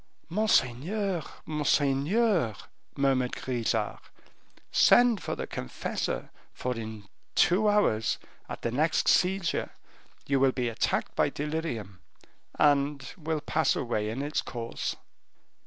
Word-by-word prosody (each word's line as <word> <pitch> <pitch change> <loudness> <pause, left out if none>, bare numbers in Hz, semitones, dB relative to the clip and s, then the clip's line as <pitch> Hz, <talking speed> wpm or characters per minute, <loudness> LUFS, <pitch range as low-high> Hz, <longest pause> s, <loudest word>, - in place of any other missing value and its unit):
"Monseigneur, 185 - +1 0.2
monseigneur," 150 - +2 0.4
murmured 135 -3 +2
Grisart, 115 -4 -1 0.7
"send 240 -4 +5
for - - -3
the - - -4
confessor, 60 - -4 0.2
for 125 0 -3
in 110 -2 -6 0.3
two 205 +5 +4
hours, 115 - +2 0.3
at - - -7
the 120 - 0
next 155 +6 +1
seizure, 185 -1 +2 0.6
you 140 -1 +1
will 135 -1 +4
be 125 -2 -1
attacked 115 - -1
by - - +3
delirium, 145 - -4 0.6
and 140 -1 +2
will 160 -2 -3
pass 160 +2 +1
away 110 -4 -1
in 125 +6 -3
its 150 +1 -1
course." 115 -2 -4
140 Hz, 110 wpm, -28 LUFS, 120-170 Hz, 0.7 s, send